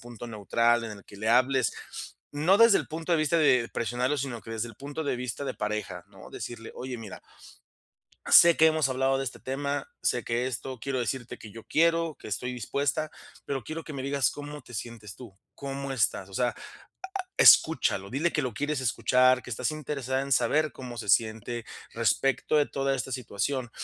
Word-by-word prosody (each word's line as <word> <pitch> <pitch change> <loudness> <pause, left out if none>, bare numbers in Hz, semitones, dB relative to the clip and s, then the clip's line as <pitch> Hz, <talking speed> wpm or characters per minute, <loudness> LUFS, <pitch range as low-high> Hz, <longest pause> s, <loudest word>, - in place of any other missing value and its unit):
punto 120 0 -9
neutral, 115 +2 +1
en 110 - -5
el - - -16
que 100 - -14
le 110 - -2
hables, 130 +2 +3 0.6
no 165 +8 +3
desde 230 -3 +7
el - - -5
punto 165 +2 -3
de 165 - +4
vista 155 +2 +2
de 125 -6 +4
presionarlo, 125 +5 -1
sino 125 -3 -4
que - - -10
desde 115 +1 -2
el 115 - -12
punto 145 +4 -5
de 140 - 0
vista 125 +3 -4
de - - -3
pareja, 105 0 -4
¿no?, - - -14
decirle: 115 -1 -7
"Oye, 125 -1 -6
mira" 110 -3 -8 1.1
sé 170 -1 +9
que 160 - +6
hemos 155 -3 +2
hablado 135 +1 +1
de 135 - -2
este 130 - -5
tema, 140 +1 -3
sé 120 - 0
que 120 +2 -1
esto 130 0 -5
quiero 135 0 -2
decirte 120 +1 -4
que 110 - -11
yo 115 +2 -11
quiero, 165 -1 +2
que - - -10
estoy 125 +5 -3
dispuesta, 140 +6 -2 0.3
pero 135 -5 -4
quiero 160 +1 -5
que 155 - -8
me 140 - -5
digas 140 -2 +1
cómo 145 0 -8
te 120 - -15
sientes 110 -3 -7
tú, 110 -7 -12 0.2
cómo 140 0 -5
estás", 110 -6 0
o - - -14
sea, 120 +4 0 0.8
escúchalo, 115 -11 +5
dile 150 +9 0
que 155 - +1
lo 125 -6 -3
quieres 145 +1 -1
escuchar, 130 +1 +3
que - - -10
estás 125 +4 -1
interesada 135 -3 -2
en 140 0 -3
saber 155 +4 +2
cómo 125 -2 -8
se 105 -4 -1
siente 115 +1 0 0.3
respecto 120 +6 +1
de 150 - +5
toda 135 -1 -1
esta 130 +1 -4
situación, 125 +1 -2
130 Hz, 195 wpm, -28 LUFS, 115-145 Hz, 1.1 s, sé